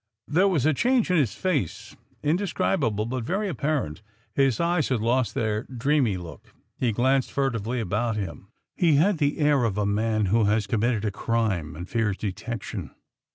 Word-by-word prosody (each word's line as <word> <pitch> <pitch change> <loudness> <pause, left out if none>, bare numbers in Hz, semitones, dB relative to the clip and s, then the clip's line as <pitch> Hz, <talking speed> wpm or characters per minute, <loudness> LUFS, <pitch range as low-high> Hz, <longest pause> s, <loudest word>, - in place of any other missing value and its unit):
There 180 +7 +3
was 160 -9 +1
a 155 - +4
change 240 - +2
in 180 - +4
his 125 -11 +1
face, 150 - -2 0.3
indescribable 150 - 0
but 125 +1 -3
very 195 - -1
apparent. 140 - -2 0.3
His 135 -4 +2
eyes 170 -3 +1
had 130 -3 +1
lost 120 +2 +1
their 110 -4 0
dreamy 130 -4 +1
look, 85 -6 -11 0.2
he 125 -3 0
glanced 130 +4 +1
furtively 125 -3 -1
about 110 +2 -1
him, 95 -2 -5 0.3
he 165 -5 +3
had 170 +4 +3
the 145 -1 +1
air 145 -4 +3
of 105 -4 0
a 105 - +1
man 110 +1 +1
who 115 -2 +4
has 105 0 +2
committed 115 -1 0
a 105 - 0
crime 100 -7 -1
and 90 +3 -7
fears 110 -4 0
detection. 105 +2 -5
120 Hz, 170 wpm, -25 LUFS, 105-150 Hz, 0.3 s, a